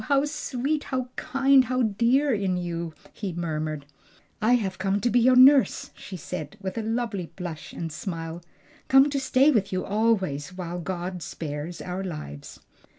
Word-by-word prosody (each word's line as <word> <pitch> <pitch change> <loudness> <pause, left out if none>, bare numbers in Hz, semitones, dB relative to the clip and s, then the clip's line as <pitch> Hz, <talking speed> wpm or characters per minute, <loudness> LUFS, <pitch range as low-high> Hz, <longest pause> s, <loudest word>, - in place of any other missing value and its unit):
how 280 0 +3
sweet, 295 0 -2
how 255 -1 -2
kind, 270 0 +4
how 255 +1 0
dear 240 +6 +2
in 195 -4 0
you!" 170 -1 -3 0.2
he 200 -4 -4
murmured. 155 -3 -3 0.6
"I 225 +3 +4
have 190 -6 -2
come 195 +1 +1
to 240 +4 0
be 245 - +4
your 255 +2 +5
nurse," 265 +1 +6
she 190 - -8
said, 175 +3 -6
with 190 -2 -5
a - - -1
lovely 225 -5 -2
blush 175 -4 -6
and 165 -1 -5
smile, 165 0 -5 0.5
"come 270 +2 +6
to 280 - 0
stay 270 +2 +4
with 200 -7 +1
you 185 -1 -1
always 190 -7 0
while 175 -1 -4
God 180 +1 -4
spares 155 +2 -5
our 185 +1 -4
lives." 150 - -7
195 Hz, 165 wpm, -26 LUFS, 175-255 Hz, 0.6 s, nurse